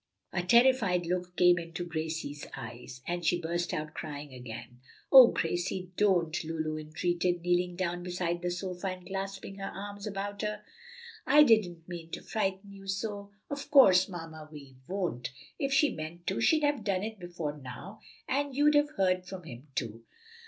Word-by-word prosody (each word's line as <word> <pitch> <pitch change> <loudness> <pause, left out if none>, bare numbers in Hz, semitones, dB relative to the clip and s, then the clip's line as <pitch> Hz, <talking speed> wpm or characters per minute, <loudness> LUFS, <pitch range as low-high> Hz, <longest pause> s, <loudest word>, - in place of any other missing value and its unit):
A 175 - +1
terrified 220 -3 +4
look 180 +1 -2
came 175 -1 +6
into 170 +1 -5
Gracie's 160 -3 -4
eyes, 125 +1 -9
and 175 0 -2
she 175 +2 +2
burst 170 +1 -2
out 155 0 -3
crying 145 -2 -6
again. 120 -1 -9 0.3
"O 260 -3 +11
Gracie, 180 0 -2
don't!" 175 -6 +2
Lulu 155 -1 -2
entreated, 175 +3 -1
kneeling 180 0 +1
down 175 -1 -2
beside 175 -1 -2
the 180 - -1
sofa 180 +1 -4
and 185 -1 -5
clasping 195 0 -5
her 195 - -4
arms 205 +1 -7
about 200 0 -4
her. 210 0 -3 0.6
"I 295 +2 +8
didn't 185 - +3
mean 170 -2 -7
to - - -5
frighten 200 -2 -2
you 195 0 -12
so. 200 +1 -3 0.2
Of 285 0 -5
course, 195 -10 +7
Mamma 160 -3 -8
Vi 140 -3 -11
won't; 180 -11 -2 0.3
if 275 -1 0
she 285 +2 +4
meant 165 +2 -7
to 190 - -1
she'd 310 +6 +4
have 290 -6 +1
done 195 -2 0
it 220 -1 -5
before 170 -4 -4
now, 135 +11 -9 0.3
and 280 0 -1
you'd 295 +2 +5
have 290 0 +4
heard 185 -1 +2
from 185 -1 -7
him, 130 -2 -10
too." 115 -2 -3
180 Hz, 170 wpm, -30 LUFS, 165-200 Hz, 0.6 s, O